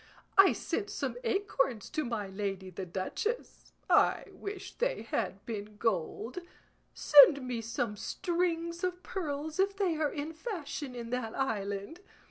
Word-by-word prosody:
I 390 -1 +8
sent 410 -2 -2
some - - -2
acorns 330 - 0
to 310 -1 0
my 230 -5 -2
lady 190 -1 -4
the 185 +1 -6
duchess; 190 - -3 0.2
I - - +4
wish 400 0 -7
they - - -1
had - - -2
been 210 -2 -6
gold. 220 - -1 0.6
Send 280 -1 +8
me 240 -2 -2
some 230 -1 -2
strings 340 - -1
of 365 0 -2
pearls 310 -2 -4
if 395 +1 +2
they 365 -6 +1
are 305 -2 +1
in 295 +3 -4
fashion 310 - -5
in 235 -1 -6
that 250 -3 -2
island. 205 - -2
285 Hz, 140 wpm, -31 LUFS, 215-360 Hz, 0.6 s, I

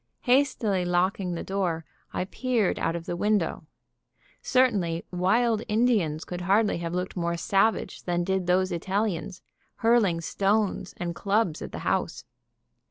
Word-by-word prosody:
Hastily 245 -7 +2
locking 180 +1 0
the - - -4
door, 180 -5 -2 0.3
I 180 - -2
peered 235 -1 0
out 165 - 0
of 170 -1 -5
the 175 - -3
window. 200 -5 0 0.7
Certainly 200 -11 +1
wild 215 +5 +2
Indians 210 -9 +1
could 180 0 -5
hardly 200 +1 +2
have 170 0 -3
looked 180 +1 -3
more 170 -1 -1
savage 195 +5 +1
than 175 -1 -1
did 190 0 -1
those 185 +1 +2
Italians, 190 0 -2 0.3
hurling 225 -7 +3
stones 195 +2 0
and 175 -1 -3
clubs 200 -3 0
at - - -6
the - - -6
house. - - -1
190 Hz, 140 wpm, -26 LUFS, 175-215 Hz, 0.7 s, hurling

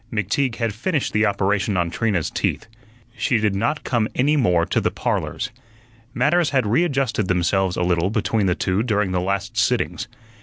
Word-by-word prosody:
McTeague 115 +4 0
had 115 -3 -2
finished 145 - -2
the 110 +1 +3
operation 100 0 0
on 85 -1 0
Trina's 100 -6 -1
teeth. - - -1 0.5
She 120 0 +1
did 105 -2 +1
not 120 +10 -1
come 115 -4 0
any 145 +4 +2
more 90 - +2
to - - 0
the - - +1
"Parlors." 125 - -2 0.6
Matters 150 +7 +2
had 135 -4 +1
readjusted 130 - +1
themselves 90 +1 +1
a 90 - +1
little 90 0 +1
between 110 -1 0
the 90 - +2
two 95 +1 0
during 105 -5 0
the 90 -1 0
last 100 +2 -2
sittings. - - 0
105 Hz, 175 wpm, -22 LUFS, 95-125 Hz, 0.6 s, the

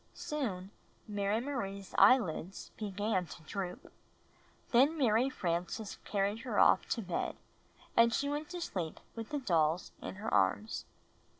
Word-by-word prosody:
Soon 245 - -3 0.4
Mary 205 0 0
Marie's 200 -8 -4
eyelids 195 -5 +3
began 205 -3 -1
to 165 - -11
droop; 180 +1 -5 0.8
then 275 +6 +5
Mary 245 -1 +3
Frances 180 -1 -2
carried 200 +1 0
her 230 -3 -3
off - - +5
to 230 - -1
bed, 185 -2 -2 0.6
and 230 0 +6
she 280 +5 0
went 295 +1 -3
to 355 -1 -5
sleep 180 - -3 0.2
with 225 -1 -6
the 295 - -1
dolls 170 - +1
in - - -6
her 210 +3 -4
arms. 215 +1 +1
210 Hz, 135 wpm, -33 LUFS, 185-255 Hz, 0.8 s, and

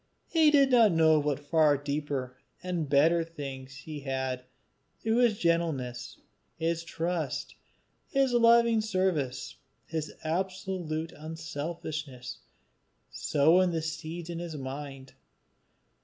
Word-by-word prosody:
He 320 -2 +4
did 280 -2 +5
not 230 -6 +6
know 160 -1 +5
of 150 - 0
what 145 -2 0
far 150 0 +3
deeper 140 -3 -3 0.3
and 175 -5 -2
better 160 +4 +4
things 135 -4 -8
he 150 +1 -7
had, 130 -2 -3 0.5
through 225 +1 +1
his 240 -4 +4
gentleness, 160 -9 -1 0.4
his 165 +1 -1
trust, 165 -4 -3 0.5
his 270 -2 +2
loving 235 -1 +5
service, 185 - -1 0.3
his 155 -1 -4
absolute 175 -2 -2
unselfishness, 155 -3 -6 0.7
sown 165 +6 +3
the 165 -2 -2
seeds 165 +1 -5
in 170 - -4
his 170 -3 -5
mind. 135 0 -7
160 Hz, 110 wpm, -29 LUFS, 145-180 Hz, 0.7 s, not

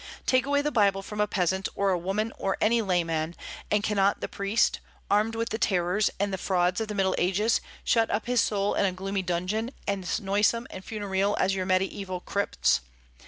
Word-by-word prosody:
Take 255 +1 +2
away 285 0 +2
the 300 - 0
Bible 200 -5 +2
from 210 +1 -3
a 210 - +2
peasant, 190 -1 0
or 200 -1 +1
a - - +3
woman, 210 +5 -2
or 195 - -1
any 230 +2 +3
layman, 170 -4 0 0.3
and 210 0 +2
cannot 200 -2 +2
the - - -3
priest, 200 +3 +1 0.3
armed 215 +2 +2
with 230 0 -2
the 220 - -3
terrors 185 +1 +2
and 200 0 0
the 190 - -2
frauds 180 +1 +1
of 220 - -2
the 210 - -5
Middle 190 -1 +2
Ages, 205 +5 +2 0.2
shut 225 -2 +2
up 210 - -1
his 245 -1 +2
soul 200 -1 0
in - - +2
a 190 - +2
gloomy 195 +1 -2
dungeon, 185 +6 -1 0.2
as 195 -3 -1
noisome 205 +4 +1
and 185 - -8
funereal 205 -1 -1
as 195 - +2
your 185 -1 -2
Mediaeval 185 0 -1
crypts? 200 - +1
200 Hz, 200 wpm, -27 LUFS, 185-215 Hz, 0.3 s, a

